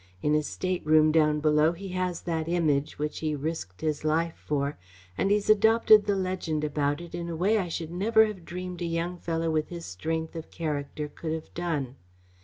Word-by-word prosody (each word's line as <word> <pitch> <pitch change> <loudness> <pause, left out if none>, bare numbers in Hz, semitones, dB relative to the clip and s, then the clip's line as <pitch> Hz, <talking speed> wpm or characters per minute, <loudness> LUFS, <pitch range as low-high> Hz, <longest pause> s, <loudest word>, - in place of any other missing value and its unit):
In 150 - +2
his 150 -1 +1
stateroom 155 -4 +2
down 150 -1 +3
below 155 +1 +4
he 195 +3 -8
has 180 -1 -2
that 165 -2 -2
Image 155 -5 +1
which 150 0 -3
he 155 -1 -1
risked 145 - -5
his 155 -2 -1
life 160 +2 +1
for, 145 0 -2 0.4
and 195 - +1
he's 205 0 +2
adopted 215 0 +6
the 200 - +2
legend 185 -5 -2
about 145 0 0
it 175 - -10
in 170 0 -4
a 165 - -3
way 200 +7 +2
I 185 - -1
should 165 -1 -4
never 220 +5 +4
have 210 -5 -6
dreamed 180 +1 -6
a - - -1
young 170 +1 -2
fellow 165 -1 -1
with 155 -1 0
his 170 -1 -7
strength 160 - -3
of 160 -1 -7
character 150 -2 -3
could 155 +2 -5
have 160 -1 -6
done. 150 -7 -3
165 Hz, 200 wpm, -27 LUFS, 150-180 Hz, 0.4 s, adopted